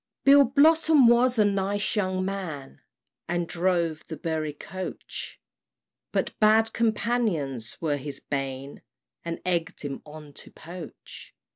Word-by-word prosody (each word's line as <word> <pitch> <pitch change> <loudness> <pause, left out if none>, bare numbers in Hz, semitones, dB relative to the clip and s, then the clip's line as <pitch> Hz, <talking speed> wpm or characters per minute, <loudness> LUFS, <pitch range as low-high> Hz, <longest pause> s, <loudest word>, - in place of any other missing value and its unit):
Bill 280 0 +7
Blossom 305 +1 +5
was 240 +1 +4
a 215 - +5
nice 200 +1 0
young 185 -2 0
man, 175 -9 -5 0.5
And 175 0 -1
drove 170 -3 0
the 160 - -6
Bury 155 -1 -2
coach; 185 +5 -7 0.7
But - - -1
bad 220 +1 +4
companions 210 - 0
were 150 -3 0
his 145 +1 -6
bane, 135 0 -4 0.4
And 170 0 -4
egg'd 175 -2 -1
him 140 -2 -5
on 150 -1 -12
to - - -9
poach. 170 -1 -11
180 Hz, 125 wpm, -26 LUFS, 150-220 Hz, 0.7 s, Bill